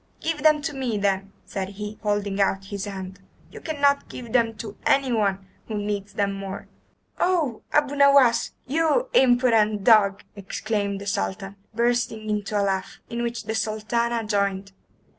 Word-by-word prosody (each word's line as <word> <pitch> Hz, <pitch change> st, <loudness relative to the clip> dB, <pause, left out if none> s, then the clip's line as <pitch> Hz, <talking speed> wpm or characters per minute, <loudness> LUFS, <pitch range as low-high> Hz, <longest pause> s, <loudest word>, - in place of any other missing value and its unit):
"Give 320 Hz, -2 st, -2 dB
them 305 Hz, -1 st, +4 dB
to 300 Hz, -, -2 dB
me, 255 Hz, -5 st, -2 dB
then," 195 Hz, -1 st, 0 dB
said 195 Hz, -2 st, -4 dB
he, 210 Hz, +1 st, -6 dB
holding 205 Hz, -1 st, 0 dB
out 195 Hz, 0 st, +1 dB
his 200 Hz, 0 st, -3 dB
hand. 190 Hz, -1 st, -7 dB, 0.3 s
"You -, -, -10 dB
cannot 285 Hz, -3 st, +1 dB
give 235 Hz, -3 st, -8 dB
them 230 Hz, -2 st, +2 dB
to 215 Hz, -2 st, -7 dB
anyone 215 Hz, -8 st, +1 dB, 0.2 s
who 215 Hz, -, -3 dB
needs 205 Hz, -1 st, -3 dB
them 200 Hz, -1 st, 0 dB
more." 195 Hz, 0 st, -6 dB, 0.5 s
"Oh, 330 Hz, -10 st, +1 dB
Abu 290 Hz, -1 st, +2 dB
Nowas, 280 Hz, -4 st, +5 dB
you 325 Hz, -, +1 dB
impudent 235 Hz, -, +4 dB
dog!" 200 Hz, -4 st, +5 dB
exclaimed 200 Hz, 0 st, -3 dB
the -, -, -7 dB
Sultan, 195 Hz, -, -3 dB, 0.2 s
bursting 235 Hz, -2 st, 0 dB
into 210 Hz, 0 st, -1 dB
a -, -, +2 dB
laugh, 190 Hz, -1 st, -2 dB
in 235 Hz, 0 st, -2 dB
which 235 Hz, -1 st, -3 dB
the 220 Hz, +1 st, -3 dB
Sultana 225 Hz, +2 st, -1 dB
joined. 200 Hz, -2 st, -1 dB
215 Hz, 155 wpm, -24 LUFS, 200-245 Hz, 0.5 s, Nowas